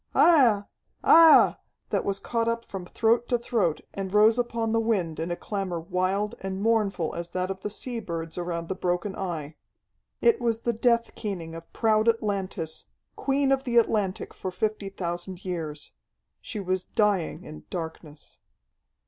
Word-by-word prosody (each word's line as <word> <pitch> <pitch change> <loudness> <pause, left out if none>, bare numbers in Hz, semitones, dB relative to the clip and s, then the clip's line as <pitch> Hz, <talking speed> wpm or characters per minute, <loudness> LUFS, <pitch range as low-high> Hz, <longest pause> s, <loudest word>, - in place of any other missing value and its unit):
Aiah! 245 -12 +5 0.4
Aiah!" 325 -1 +7 0.3
that - - +1
was 200 -1 -1
caught 230 +2 -1
up 230 0 -1
from 185 -2 -7
throat 230 +4 +1
to 245 - +3
throat 230 -9 0
and 195 -1 -4
rose 215 +3 +5
upon 230 -2 -1
the 230 - +2
wind 195 -8 0
in 165 +2 -2
a 175 - -1
clamor 195 -3 -3
wild 185 +4 -1
and 190 0 -4
mournful 205 -6 +1
as 170 0 -5
that 185 +1 -2
of 190 0 -7
the 210 - -3
sea 235 +3 -5
birds 165 -5 -5
around 170 -1 -3
the 190 - -2
broken 180 +1 -2
Eye. 160 -5 -5 0.6
It 470 - +3
was 230 -1 0
the 235 - 0
death 235 0 +1
keening 180 -7 -5
of 165 0 -10
proud 220 0 +3
Atlantis, 200 -7 -2 0.3
Queen 275 0 +1
of 270 0 +2
the 240 -3 0
Atlantic 210 -4 +1
for 185 - -5
fifty 205 +2 -2
thousand 175 0 -5
years. 160 -5 -5 0.5
She 215 - -6
was 185 -1 -1
dying 195 -5 0
in 155 0 -11
darkness. 160 -3 -7
195 Hz, 165 wpm, -26 LUFS, 175-230 Hz, 0.6 s, Aiah